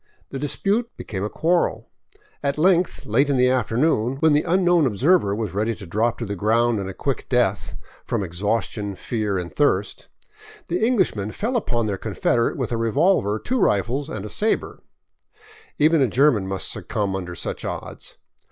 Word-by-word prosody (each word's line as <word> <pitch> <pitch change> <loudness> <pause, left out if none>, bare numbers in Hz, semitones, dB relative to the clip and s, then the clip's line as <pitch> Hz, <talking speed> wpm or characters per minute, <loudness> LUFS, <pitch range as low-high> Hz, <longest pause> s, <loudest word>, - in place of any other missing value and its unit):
The 135 - -4
dispute 200 - -1
became 95 -2 -5
a 105 - -2
quarrel. 170 +7 0 0.5
At 140 0 -1
length, 175 +2 +2
late 135 +7 +2
in 140 - +2
the 125 0 +4
after 120 -3 0
noon, 130 -4 +2
when 155 +2 +3
the 145 - +4
unknown 175 -3 +3
observer 125 - +2
was 110 -3 -3
ready 110 +3 0
to 100 - -10
drop 110 +7 0
to 115 - -4
the 100 -1 -4
ground 115 +3 +2
and 95 -1 -4
a - - -6
quick 140 +5 -3
death, 105 -5 0 0.3
from - - -2
exhaustion, 100 +3 -2
fear, 105 0 -2
and 90 -1 -5
thirst, 105 -9 0 0.6
the 175 +5 0
Englishmen 190 - +1
fell 225 - -3
upon 120 - 0
their 100 -2 -2
confederate 120 -1 0
with 130 -4 -3
a 115 - 0
revolver, 115 - +2
two 255 - -2
rifles, 125 - +1
and 105 -6 -5
a - - -6
sabre. 220 - -1 1.0
Even 155 +1 +4
a 130 - +4
German 120 -5 +3
must 95 0 -1
succumb 100 -2 -2
under 90 -2 -5
such - - -4
odds. - - -6
120 Hz, 175 wpm, -22 LUFS, 105-150 Hz, 1.0 s, the